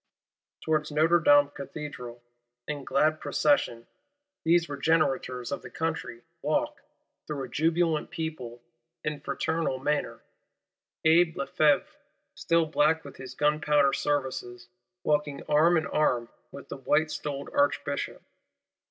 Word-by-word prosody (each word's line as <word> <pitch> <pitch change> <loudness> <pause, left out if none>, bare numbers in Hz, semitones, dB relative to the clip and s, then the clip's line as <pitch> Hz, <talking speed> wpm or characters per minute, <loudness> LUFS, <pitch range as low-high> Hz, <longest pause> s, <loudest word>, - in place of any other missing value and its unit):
_ - - -67
Towards 155 -1 +1
Notre 160 +3 +4
Dame 145 -2 +5
Cathedral, 140 -5 -8 0.4
in 145 -2 -4
glad 155 +4 +2
procession, 135 -5 +1 0.6
these 170 +1 +3
Regenerators 135 -5 0
of 140 - -3
the - - -10
Country 160 -7 -4 0.2
walk, - - -1 0.5
through 145 -3 -4
a - - -5
jubilant 160 +3 +1
people; 125 -8 -6 0.4
in 150 -1 -3
fraternal 160 0 -1
manner; 150 +3 -2 0.8
Abbé 165 +1 +5
Lefevre, 145 +1 +2 0.5
still 165 0 +1
black 160 +1 +2
with 140 - -11
his 130 -1 -9
gunpowder 150 -1 +2
services, 130 -4 -2 0.3
walking 150 -1 0
arm 160 +4 +4
in 160 - 0
arm 120 -6 +1 0.2
with 140 - -11
the - - -6
white 155 +3 +1
stoled 145 -2 -5
Archbishop. 140 0 0
150 Hz, 120 wpm, -28 LUFS, 135-160 Hz, 0.8 s, Dame